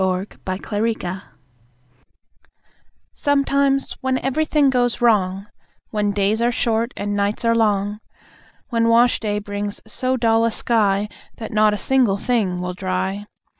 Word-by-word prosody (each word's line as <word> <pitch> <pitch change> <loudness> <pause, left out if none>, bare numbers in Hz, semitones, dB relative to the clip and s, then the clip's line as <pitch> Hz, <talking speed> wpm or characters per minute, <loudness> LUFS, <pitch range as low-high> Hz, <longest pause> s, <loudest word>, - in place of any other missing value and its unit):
In 185 +1 0 0.2
Such 185 +3 -5
an 220 +2 0
Hour 185 +1 -4 1.9
Sometimes, 280 -1 +1
when 260 0 0
everything 285 +1 +1
goes 245 -2 +1
wrong: 200 -5 +2 0.5
When 210 -1 0
days 205 +2 +1
are 240 +1 +2
short, 230 0 0
and 205 0 -2
nights 205 +3 -1
are 230 - +4
long; 210 -2 +1 0.7
When 230 -2 +1
wash 235 +2 +4
day 210 -2 -2
brings 205 0 -4
so 255 +4 -1
dull 225 -1 +3
a 230 - +3
sky 210 -3 +1 0.3
That 225 - -7
not 215 0 +4
a - - -4
single 245 -5 +2
thing 200 -6 0
will 180 0 -3
dry. 190 +2 -3
215 Hz, 140 wpm, -21 LUFS, 200-240 Hz, 1.9 s, are